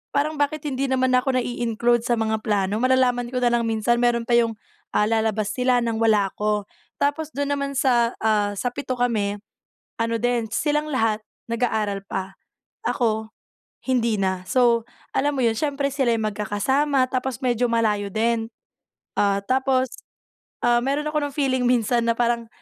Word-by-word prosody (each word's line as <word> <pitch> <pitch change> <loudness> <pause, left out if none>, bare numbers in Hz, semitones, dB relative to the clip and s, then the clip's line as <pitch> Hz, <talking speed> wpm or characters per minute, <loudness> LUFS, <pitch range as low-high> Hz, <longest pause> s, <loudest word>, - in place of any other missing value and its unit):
parang, 300 +2 +1
"Bakit 290 +1 0
hindi 270 +1 -1
naman 260 -1 +1
ako 255 +1 +2
nai-include 240 -1 0
sa 245 - +2
mga 220 -1 0
plano." 205 -1 +1
Malalaman 250 -1 +2
ko 250 - -1
na 240 - +3
lang 235 -1 +1
minsan, 225 +2 +1
meron 240 -1 +2
pa 240 - -5
yung, 230 -1 +2 0.4
ah, - - +4
lalabas 220 -2 0
sila 250 -1 +2
ng 230 -1 -1
wala 215 -3 +3
ako. 210 -1 -1 0.4
Tapos 305 +2 0
dun 285 0 -1
naman 280 -1 -2
sa, 245 -3 +2
ah, 210 -2 +2
sa 245 +5 -2
7 260 0 -4
kami, 215 -5 0 0.6
ano 230 0 0
din 245 -2 0
silang 300 +4 0
lahat 225 -4 +1 0.3
nag-aaral 220 -4 -1
pa, 190 0 -4 0.5
ako 220 -3 0 0.6
hindi 235 -4 +1
na. 190 -1 -1
So, 235 0 +3 0.3
alam 290 +1 +1
mo 260 - +1
'yon, 225 - +2
siyempre 285 0 0
sila'y 245 -5 +1
magkakasama, 255 +7 +1
tapos 255 -2 -2
medyo 245 -1 +2
malayo 210 -3 +1
din. 225 +1 0 0.7
Ah, 200 -1 +2
tapos, 260 +2 +1 0.8
ah, 240 0 +4
meron 290 +2 0
ako 300 - 0
ng 275 - -17
feeling 260 -3 +1
minsan 235 -1 +2
na 230 - +2
parang, 235 0 0
240 Hz, 160 wpm, -23 LUFS, 220-260 Hz, 0.8 s, ah